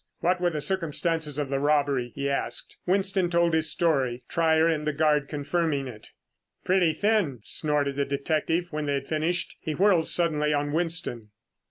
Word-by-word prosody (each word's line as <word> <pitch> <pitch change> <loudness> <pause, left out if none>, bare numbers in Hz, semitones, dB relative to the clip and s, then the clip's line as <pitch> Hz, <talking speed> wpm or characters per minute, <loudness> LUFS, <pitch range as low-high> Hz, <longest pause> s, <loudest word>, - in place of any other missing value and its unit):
"What 180 +1 +1
were 175 - +3
the 155 -3 -3
circumstances 165 -2 -1
of 145 -2 -2
the 135 0 0
robbery?" 140 -4 +1
he 140 0 -2
asked. 140 0 -2
Winston 190 -1 +1
told 170 -1 +2
his 160 0 +1
story, 135 -7 0
Trier 160 -1 +3
and 155 -2 -1
the 150 - +1
guard 150 -1 +2
confirming 145 -1 -1
it. 110 -4 -11 0.5
"Pretty 180 -3 +3
thin!" 190 - 0
snorted 145 -2 -1
the 140 - +1
detective 155 +5 -1
when 150 -1 -2
they 140 - +1
had 135 0 -4
finished. 160 +3 -1
He 155 - -4
whirled 185 -3 +3
suddenly 150 -3 +2
on 145 0 -1
Winston. 160 -9 -2
155 Hz, 170 wpm, -26 LUFS, 140-170 Hz, 0.5 s, were